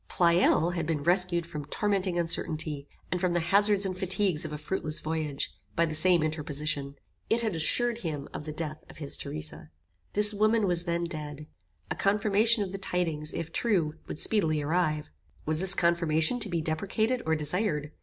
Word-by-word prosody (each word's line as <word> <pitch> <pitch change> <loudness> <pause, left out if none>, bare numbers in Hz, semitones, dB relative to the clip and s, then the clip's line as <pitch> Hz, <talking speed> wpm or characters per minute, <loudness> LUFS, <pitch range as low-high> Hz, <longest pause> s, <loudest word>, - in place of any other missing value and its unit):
Pleyel 170 -1 +3
had 170 -3 -3
been 155 -3 -2
rescued 175 0 +2
from 150 -3 -7
tormenting 195 +1 -1
uncertainty, 155 -3 -1 0.2
and 180 - -1
from 180 -2 +1
the 175 - +1
hazards 200 +4 +3
and 185 -1 -3
fatigues 185 -3 0
of 155 - -6
a 150 - -5
fruitless 155 0 -3
voyage, 155 -3 -3 0.2
by 170 - +3
the 155 - -4
same 170 +1 +4
interposition. 150 -2 -3 0.3
It 230 +1 +2
had 220 -6 -2
assured 235 +9 +3
him 150 -8 -5
of 150 - -7
the 155 - -5
death 155 0 -5
of - - -14
his 145 -3 0
Theresa. 150 - -6 0.4
This 210 +1 +6
woman 215 +1 +2
was 175 -2 +1
then 170 -1 -1
dead. 150 -3 -6 0.5
A - - -1
confirmation 210 +2 +3
of 190 - -6
the 195 - -6
tidings, 165 -5 -2
if 165 0 -6
true, 180 -10 0
would - - -6
speedily 160 -6 +2
arrive. 155 0 -1 0.3
Was 155 0 0
this 190 +1 +6
confirmation 170 +4 +2
to 215 -3 +2
be 170 -2 -1
deprecated 200 +10 -1
or 160 - +2
desired? 150 -1 -2
170 Hz, 180 wpm, -28 LUFS, 155-195 Hz, 0.5 s, This